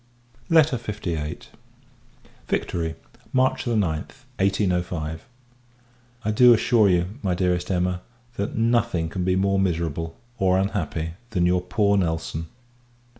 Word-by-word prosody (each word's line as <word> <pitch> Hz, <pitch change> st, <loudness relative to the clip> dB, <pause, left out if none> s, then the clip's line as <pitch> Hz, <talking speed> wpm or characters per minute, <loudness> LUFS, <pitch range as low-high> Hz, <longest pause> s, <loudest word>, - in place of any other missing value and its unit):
LETTER 155 Hz, -5 st, +5 dB
LVIII. 90 Hz, -9 st, -4 dB, 1.0 s
Victory, 80 Hz, -2 st, -1 dB, 0.4 s
March 130 Hz, 0 st, +2 dB
9th, 105 Hz, -, -2 dB
1805. 90 Hz, -4 st, -1 dB, 1.0 s
I 110 Hz, -, +2 dB
do 120 Hz, +2 st, +7 dB
assure 110 Hz, -2 st, +4 dB
you, 90 Hz, +6 st, 0 dB
my 90 Hz, -2 st, 0 dB
Dearest 90 Hz, -1 st, 0 dB
Emma, 90 Hz, -1 st, 0 dB, 0.3 s
that 100 Hz, 0 st, -3 dB
nothing 115 Hz, -7 st, +1 dB
can 90 Hz, +2 st, -3 dB
be 90 Hz, 0 st, +2 dB
more 100 Hz, +1 st, +2 dB
miserable, 80 Hz, -3 st, -1 dB, 0.2 s
or 95 Hz, -1 st, +3 dB
unhappy, 85 Hz, -4 st, -1 dB, 0.2 s
than 90 Hz, -6 st, +1 dB
your 90 Hz, 0 st, +2 dB
poor 100 Hz, +3 st, +2 dB
Nelson. 80 Hz, -2 st, -2 dB
90 Hz, 115 wpm, -24 LUFS, 85-105 Hz, 1.0 s, do